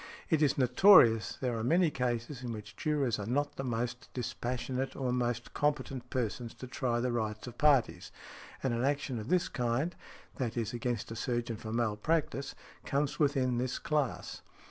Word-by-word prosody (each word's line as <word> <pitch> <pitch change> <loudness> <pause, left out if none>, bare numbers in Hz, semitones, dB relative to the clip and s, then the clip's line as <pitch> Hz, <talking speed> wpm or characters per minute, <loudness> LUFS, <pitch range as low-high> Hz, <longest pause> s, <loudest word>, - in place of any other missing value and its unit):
"It 160 -2 +3
is 145 -3 +3
notorious 125 - +6
there 125 -3 0
are - - -2
many 165 +5 +3
cases 125 0 -2
in 125 -2 -4
which 105 -3 -8
jurors 145 -6 0
are 100 - -4
not 145 +4 0
the 135 - -3
most 120 0 -3
dispassionate 125 +1 -3
or 130 -2 -1
most 120 -1 -1
competent 135 -4 -1
persons 120 -1 -3
to - - -8
try 125 -1 -1
the 125 +1 0
rights 110 -2 -2
of 120 -1 -10
parties, 115 - +3 0.5
and 130 -3 +1
an 115 +1 0
action 140 -3 0
of 110 - -7
this 180 -1 +3
kind 125 +7 -1 0.4
(i. 130 - +1
e., 115 -2 0
against 120 -2 -2
a - - -4
surgeon 120 -1 -2
for 110 0 -7
malpractice) 135 +6 0 0.3
comes 145 +3 -1
within 135 -5 +2
this 125 0 -1
class. 150 -4 -2
125 Hz, 170 wpm, -32 LUFS, 115-140 Hz, 0.5 s, notorious